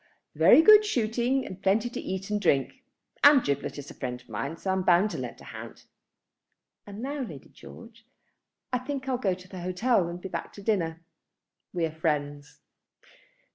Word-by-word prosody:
"Very 320 - +6
good 425 +3 +8
shooting, 245 - 0
and 185 0 -9
plenty 205 +5 +2
to 240 - -6
eat 190 +2 -5
and 210 0 0
drink, 165 - +1 0.4
and 285 -3 +8
Giblet 140 +1 -2
is 145 -1 -8
a - - -10
friend 125 -2 -5
of 125 0 -23
mine; 135 +9 -4
so 190 - -2
I'm 190 0 0
bound 185 +3 +3
to - - -5
lend - - -6
a - - -12
hand. - - -10 1.0
And 205 +3 -8
now, 285 +2 -3
Lady 160 - -8
George, 230 0 -14 0.7
I 250 - +2
think 270 +1 -5
I'll 255 -2 -1
go 190 -7 0
to 185 0 -15
the 185 -1 -9
hotel 185 +2 +1
and 170 +1 -6
be 185 - -7
back - - -6
to 200 - -11
dinner. 165 -6 -1 0.7
We 175 -2 -1
are 160 - -4
friends." 145 -2 -3
190 Hz, 185 wpm, -27 LUFS, 165-240 Hz, 1.0 s, good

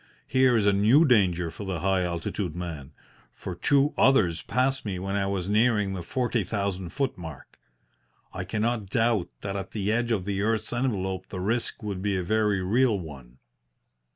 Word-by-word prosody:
Here 130 -1 +3
is 105 - +1
a 100 - +4
new 110 +11 +5
danger 90 - +2
for 105 - -8
the 95 -5 -3
high 95 0 +2
altitude 85 0 -3
man, 85 -6 -6 0.4
for 90 - -7
two 140 - +2
others 110 -12 +4
passed 130 +2 0
me 100 -4 -3
when 95 +2 -3
I 100 -1 0
was 95 -2 -2
nearing 105 -2 +2
the 95 - -4
forty 120 +4 -1
thousand 95 -2 -3
foot 135 -5 -2
mark. 80 -6 -10 0.7
I 95 - -4
cannot 110 +2 -1
doubt 115 -3 +1
that 100 -1 -4
at 95 -1 -5
the 105 -1 -1
edge 120 +1 0
of 100 -5 0
the 100 -1 -1
earth's 110 +2 -1
envelope 95 -7 -2
the 95 - -5
risk 115 +4 -2
would 100 -3 -4
be 100 -1 0
a 90 - -2
very 105 0 +1
real 115 +3 +2
one. 65 -7 -10
100 Hz, 180 wpm, -26 LUFS, 90-115 Hz, 0.7 s, new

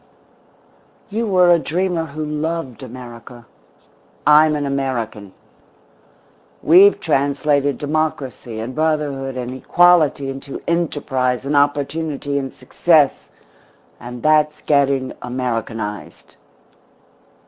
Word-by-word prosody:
You 225 +2 -2
were 180 -3 +4
a 170 - +5
dreamer 175 +1 -1
who 155 +1 -6
loved 150 -3 -4
America. 120 -1 -11 0.8
I'm 150 +1 +5
an 145 -1 -2
American. 125 -7 -3 1.3
We've 190 +6 +6
translated 145 -1 +1
democracy 145 -6 -3
and 115 +4 -5
brotherhood 145 -4 -1
and 125 0 -4
equality 160 0 +3
into 135 +1 -8
enterprise 135 -7 -1
and 145 +1 -1
opportunity 145 0 0
and 135 -1 -5
success 150 +2 +1 0.7
and 120 0 -9
that's 150 0 +2
getting 140 -3 +1
Americanised. 115 -4 -5
140 Hz, 95 wpm, -19 LUFS, 130-155 Hz, 1.3 s, We've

